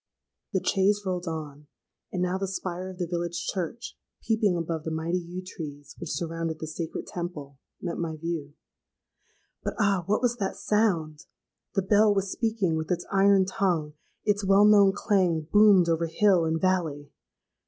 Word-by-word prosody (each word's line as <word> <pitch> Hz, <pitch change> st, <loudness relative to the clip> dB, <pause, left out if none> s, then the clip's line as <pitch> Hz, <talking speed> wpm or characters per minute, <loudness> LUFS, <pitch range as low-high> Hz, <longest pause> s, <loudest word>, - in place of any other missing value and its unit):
The 190 Hz, -, -1 dB
chaise 200 Hz, +2 st, +2 dB
rolled 180 Hz, -1 st, -2 dB
on; 150 Hz, -2 st, -6 dB, 0.4 s
and 180 Hz, -1 st, -1 dB
now 180 Hz, +1 st, -1 dB
the 195 Hz, -, -2 dB
spire 185 Hz, -1 st, -4 dB
of 185 Hz, -, -9 dB
the 180 Hz, -, -1 dB
village 175 Hz, 0 st, -3 dB
church, 190 Hz, +6 st, -4 dB, 0.3 s
peeping 220 Hz, -5 st, +2 dB
above 165 Hz, -2 st, -3 dB
the 160 Hz, -, -3 dB
mighty 160 Hz, +3 st, -1 dB
yew 180 Hz, +1 st, -7 dB
trees 145 Hz, -5 st, -8 dB
which -, -, -6 dB
surrounded 165 Hz, -1 st, -3 dB
the 160 Hz, -, -5 dB
sacred 160 Hz, +1 st, -5 dB
temple, 150 Hz, -6 st, -6 dB, 0.2 s
met 175 Hz, -2 st, -4 dB
my 165 Hz, -2 st, -2 dB
view. 155 Hz, -3 st, -4 dB, 1.1 s
But, -, -, -3 dB
ah! 200 Hz, -3 st, +3 dB
what 210 Hz, +5 st, +1 dB
was 240 Hz, -1 st, +1 dB
that 195 Hz, -4 st, -2 dB
sound? 170 Hz, -8 st, 0 dB, 0.5 s
The 195 Hz, -, +2 dB
bell 205 Hz, +2 st, +4 dB
was 195 Hz, -1 st, -1 dB
speaking 215 Hz, -8 st, 0 dB
with 160 Hz, 0 st, -4 dB
its 175 Hz, -1 st, -1 dB
iron 195 Hz, -1 st, +5 dB
tongue: 180 Hz, -7 st, -1 dB, 0.3 s
its 205 Hz, -1 st, +1 dB
well 195 Hz, +1 st, +5 dB
known 205 Hz, -2 st, +6 dB
clang 185 Hz, -5 st, +1 dB
boomed 195 Hz, +2 st, +5 dB
over 165 Hz, 0 st, +1 dB
hill 185 Hz, 0 st, +3 dB
and 160 Hz, 0 st, 0 dB
valley. 160 Hz, -6 st, 0 dB
180 Hz, 165 wpm, -27 LUFS, 160-195 Hz, 1.1 s, known